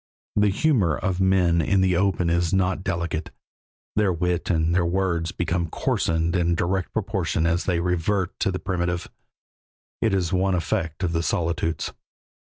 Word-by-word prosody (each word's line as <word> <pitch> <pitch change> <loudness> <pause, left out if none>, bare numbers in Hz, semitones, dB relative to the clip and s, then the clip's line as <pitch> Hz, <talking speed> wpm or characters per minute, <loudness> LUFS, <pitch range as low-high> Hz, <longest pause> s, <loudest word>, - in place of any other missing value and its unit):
The 105 0 +4
humor 100 - +2
of 95 -1 -1
men 90 -3 +3
in 95 +5 +2
the 95 -1 +3
open 95 -1 +1
is 85 -1 +1
not 95 0 +1
delicate; 85 -4 -2 0.7
their 105 -3 +3
wit 90 0 -1
and 80 -1 +2
their 90 0 +3
words 85 -2 0
become 85 -1 -1
coarsened 80 +2 0
in 85 -1 +2
direct 90 +1 -1
proportion 95 -6 -1
as 85 +1 +1
they 90 -3 +1
revert 90 +2 -1
to - - +1
the 90 - -2
primitive; 85 -1 -2 0.9
it 110 -4 +2
is 90 -1 0
one 95 0 +2
effect 80 0 -2
of 85 - +1
the 80 0 0
solitudes. 85 -1 -1
90 Hz, 160 wpm, -24 LUFS, 85-95 Hz, 0.9 s, The